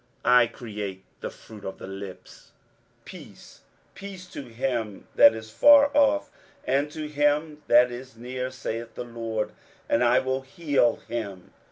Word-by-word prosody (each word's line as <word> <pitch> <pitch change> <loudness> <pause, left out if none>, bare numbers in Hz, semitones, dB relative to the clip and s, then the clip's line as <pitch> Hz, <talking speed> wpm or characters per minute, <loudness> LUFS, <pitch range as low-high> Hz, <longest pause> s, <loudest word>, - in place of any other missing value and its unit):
23:057:019 125 - +5
I 120 -2 +6
create 105 -5 -7
the - - -4
fruit 105 -3 -14
of 95 - -6
the - - -9
lips; 95 0 -10 0.5
Peace, - - -13 0.3
peace 195 -2 -9
to - - -7
him 115 -3 -3
that - - +7
is 110 -1 -9
far 285 - +6
off, 290 +1 +3 0.3
and 140 +3 +1
to 155 0 -5
him 150 +1 0
that 120 +1 +6
is 120 -1 -9
near, 125 +2 -4
saith 120 -3 -6
the - - -4
LORD; 115 -2 -4 0.4
and 120 - +2
I 120 +1 +4
will 130 +1 0
heal 140 -4 +1
him. 100 -6 -6
125 Hz, 155 wpm, -26 LUFS, 110-145 Hz, 0.5 s, that